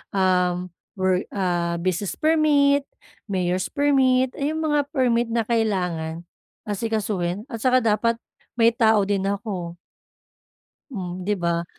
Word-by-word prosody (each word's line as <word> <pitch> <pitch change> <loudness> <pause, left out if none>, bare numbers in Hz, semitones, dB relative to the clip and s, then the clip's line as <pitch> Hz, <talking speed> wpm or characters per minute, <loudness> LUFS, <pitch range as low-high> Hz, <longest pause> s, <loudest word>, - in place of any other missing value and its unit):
Um, 180 -1 +1 0.2
wor 185 -1 +1
ah 175 -3 0
business 185 +2 -2
permit, 290 -3 +3 0.4
mayor's 185 -2 -1
permit, 265 -3 +2
ayong 310 +3 -1
mga 295 -1 +2 0.2
permit 240 -3 +2
na 230 0 0
kailangan 180 -8 -1 0.4
asikasuhin 205 -3 -2
at 230 - -5
saka 255 +2 +3
dapat 230 +1 +2 0.4
may 230 -1 +5
tao 220 -2 +3
din 195 -1 0
ako. 195 -4 -4 1.2
Hmm, 185 -6 -5
di 210 - 0
ba? 170 0 0
210 Hz, 115 wpm, -23 LUFS, 180-245 Hz, 1.2 s, may